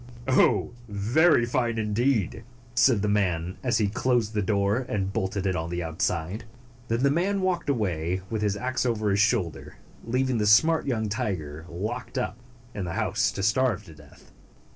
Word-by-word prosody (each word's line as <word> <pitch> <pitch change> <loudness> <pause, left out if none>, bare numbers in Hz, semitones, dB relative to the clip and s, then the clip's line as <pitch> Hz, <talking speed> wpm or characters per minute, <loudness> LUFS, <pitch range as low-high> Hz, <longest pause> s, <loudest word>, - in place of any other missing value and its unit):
"Oh, 130 -1 +3 0.2
very 120 +8 +3
fine, 120 -1 0
indeed!" 110 0 0 0.3
said 120 -4 +4
the - - +1
man, 90 -4 0
as 120 -3 +1
he 105 -2 +2
closed 115 +1 0
the 105 - 0
door 100 +1 +1
and 95 -2 -2
bolted 100 -2 -2
it 95 -1 +1
on 80 0 -3
the 85 0 -3
outside. 85 +4 -2 0.4
Then 115 +3 0
the 140 - +4
man 190 +6 +1
walked 185 -4 -1
away, 95 - -1
with 110 +1 -3
his 105 -1 0
ax 130 +3 -1
over 110 -4 0
his 100 - +1
shoulder, 85 - 0 0.3
leaving 125 +1 0
the 105 - +1
smart 160 +11 +4
young 110 -5 0
tiger 80 -7 -4
locked 105 +9 -5
up 125 -2 -2 0.3
in 100 - -4
the 85 - -4
house - - 0
to 95 - -4
starve 105 -1 +1
to 80 - -12
death. 75 -2 -18
105 Hz, 175 wpm, -26 LUFS, 95-120 Hz, 0.4 s, said